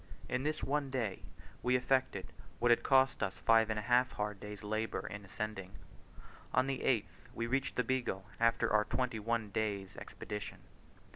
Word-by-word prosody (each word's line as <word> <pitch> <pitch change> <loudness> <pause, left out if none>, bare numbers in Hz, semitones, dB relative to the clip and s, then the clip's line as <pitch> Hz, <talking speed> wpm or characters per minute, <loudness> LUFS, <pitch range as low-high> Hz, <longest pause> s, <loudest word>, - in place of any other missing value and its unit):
In 125 - 0
this 155 +2 -1
one 140 0 0
day 115 -7 -2 0.4
we 125 +1 +2
effected 130 -5 +1 0.2
what 120 - +3
had 120 - +5
cost 130 -1 +4
us 100 -3 -1
five 115 -1 +4
and 110 - 0
a 105 - -2
half 125 +2 +3
hard 105 -1 -3
days' 105 0 -8
labour 110 +2 -2
in 105 0 -6
ascending. 95 -1 -5 0.8
On 130 - +5
the 135 -1 -1
8th, 115 -6 -1
we 115 - -1
reached 135 +3 0
the 125 - +2
Beagle 125 -8 -1
after 115 -2 +3
our 105 0 +5
twenty 125 -2 -1
one 110 -1 -1
days' 100 -3 -2
expedition. 105 -1 -6
115 Hz, 170 wpm, -34 LUFS, 105-130 Hz, 0.8 s, had